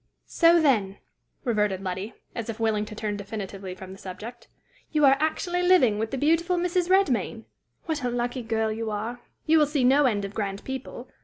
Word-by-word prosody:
"So, 335 0 +5
then," 215 -11 +2 0.5
reverted 210 -6 0
Letty, 190 +4 -4 0.2
as 230 -1 -5
if 225 - -5
willing 220 -2 +1
to 215 - -9
turn 210 -1 -3
definitively 195 -2 -6
from 185 0 -10
the 190 - -11
subject, 220 +6 -9 0.4
"you 300 -2 +4
are 270 0 +7
actually 350 +3 0
living 350 - +4
with 220 0 -1
the 270 - -3
beautiful 330 +5 +2
Mrs. 355 0 0
Redmain! 250 - +2 0.4
What 310 -4 -2
a 250 - 0
lucky 245 +1 -2
girl 225 -1 -1
you 225 0 -3
are! 225 +4 -4 0.2
You 320 0 +5
will 300 - +4
see 290 -3 0
no 275 +3 +5
end 205 -4 0
of 195 - -7
grand 200 -2 -3
people! 265 -1 -6
235 Hz, 190 wpm, -26 LUFS, 210-295 Hz, 0.5 s, are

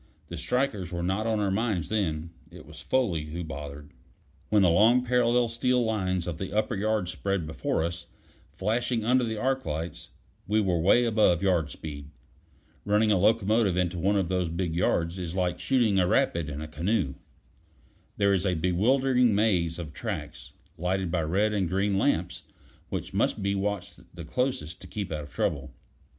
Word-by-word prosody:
The - - -6
strikers 110 -9 -1
were 85 -1 -3
not 95 +5 -1
on 110 -1 +1
our 100 -2 0
minds 100 -6 -1
then; 85 -6 -1 0.2
it 90 +1 -13
was 75 +1 -12
Foley 90 -9 0
who 85 +3 -5
bothered. 75 -1 -8 0.6
When 105 -2 +4
the 90 - +5
long 115 +8 +4
parallel 120 0 +3
steel 120 +1 +1
lines 95 -5 -1
of 85 -3 -5
the 95 0 -5
upper 110 - +1
yards 105 -2 0
spread 95 -2 -2
before 80 0 -1
us, 85 0 -4 0.4
flashing 115 +2 -1
under 125 +2 +3
the 110 -2 -2
arc 130 +4 0
lights, 80 +3 -5 0.4
we 105 +2 +2
were 95 -5 +1
away 100 +9 +4
above 105 -6 +3
yard 85 -6 +2
speed. 70 -2 -8 0.7
Running 105 +1 +3
a 100 - +4
locomotive 105 -1 +3
into 90 -1 0
one 100 +4 +2
of 95 -3 +1
those 90 -1 0
big 85 0 -2
yards 85 0 0
is 85 -1 -5
like 90 -2 0
shooting 110 -1 +2
a 90 - +3
rapid 85 -3 +1
in 75 +1 -5
a 80 - -5
canoe. 85 0 -1 1.0
There 100 -1 +3
is 95 0 +1
a 90 - +1
bewildering 120 +8 +2
maze 90 -6 +1
of 80 -4 -7
tracks, - - -6 0.3
lighted 90 0 -1
by 85 -2 +1
red 100 +7 +1
and 95 -5 0
green 95 +1 +1
lamps, 90 -8 0 0.5
which - - -4
must - - 0
be 100 0 +1
watched 100 -1 -3 0.2
the 85 -2 -8
closest 90 - -2
to - - -10
keep 100 -5 -5
out 75 -1 -3
of 70 - -15
trouble. 70 -2 -2
95 Hz, 180 wpm, -27 LUFS, 85-110 Hz, 1.0 s, the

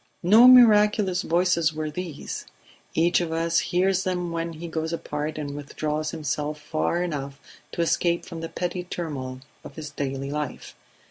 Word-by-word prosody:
No 220 +8 +8
miraculous 210 -6 +6
voices 170 -3 +1
were 155 0 -3
these; 170 -2 -6 0.5
each 170 +2 +3
of 170 -2 -3
us 165 +1 +1
hears 190 +1 +1
them 180 -2 -2
when 165 0 -3
he 165 +2 -7
goes 160 0 -3
apart 155 -2 -4
and 145 -2 -4
withdraws 150 +1 -3
himself 150 -1 -3
far 170 +3 -1
enough 140 -5 -4 0.3
to 170 - 0
escape 170 +1 +1
from 165 -1 -7
the 165 - -5
petty 180 0 -3
turmoil 135 -8 -5 0.2
of - - -11
his 155 -2 -7
daily 135 -1 -4
life. 150 0 -5
165 Hz, 155 wpm, -25 LUFS, 150-180 Hz, 0.5 s, No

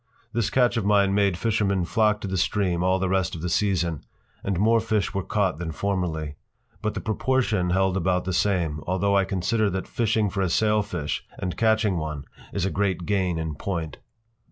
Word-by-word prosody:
This 115 -3 0
catch 125 -2 +2
of 115 - 0
mine 100 -1 +3
made 100 -3 +2
fishermen 100 -4 +1
flock 105 +2 +2
to - - -4
the 95 - -3
Stream 90 -1 +1
all 95 +1 +3
the 95 0 -1
rest 95 -2 0
of 80 - -7
the 90 - -1
season, 85 -6 0 0.4
and 95 -3 -1
more 115 +3 +4
fish 110 -3 -1
were 95 - -1
caught 95 -4 0
than 85 -2 -3
formerly. 80 -4 -2 0.4
But 110 -1 -2
the - - -3
proportion 110 -4 0
held 95 +1 +2
about 90 0 +1
the 95 - -2
same, 85 -5 +1
although 95 +2 +1
I 100 -1 +3
consider 100 +4 0
that 95 0 -3
fishing 110 -3 0
for 100 - -2
a 95 - +1
sailfish 105 -7 0
and 90 -2 -3
catching 110 -4 +2
one 75 -3 -4 0.3
is - - -1
a 95 - -1
great 95 -3 -1
gain 95 -4 0
in 80 -1 -3
point. 80 -1 -4
95 Hz, 195 wpm, -25 LUFS, 90-105 Hz, 0.4 s, more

